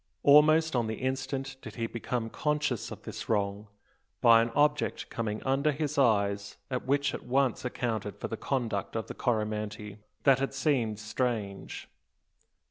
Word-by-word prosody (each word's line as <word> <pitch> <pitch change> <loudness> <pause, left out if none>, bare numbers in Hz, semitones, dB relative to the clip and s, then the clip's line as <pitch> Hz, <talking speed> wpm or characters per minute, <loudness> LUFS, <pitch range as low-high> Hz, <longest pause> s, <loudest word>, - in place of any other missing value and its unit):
Almost 155 +2 +6
on 120 -2 +1
the 110 - -2
instant 135 +1 -3
did 110 -1 -9
he 115 - -2
become 115 0 -3
conscious 150 -6 -1
of - - -9
this - - -7
wrong, 100 -1 0 0.5
by 115 -1 +7
an 115 - 0
object 150 0 +1
coming 110 -2 -3
under 135 +3 +2
his 150 0 -2
eyes 100 -6 +2
and 125 - -1
which 140 0 +2
at - - -5
once 130 0 +1
accounted 110 -5 -3
for - - -3
the 115 - -4
conduct 115 -6 -2
of 115 - -2
the - - -7
Coromantee, 105 -2 -2 0.2
that 135 -2 +5
had 135 0 -2
seemed 130 -7 +1
strange. 105 -2 -3
120 Hz, 155 wpm, -29 LUFS, 110-135 Hz, 0.5 s, by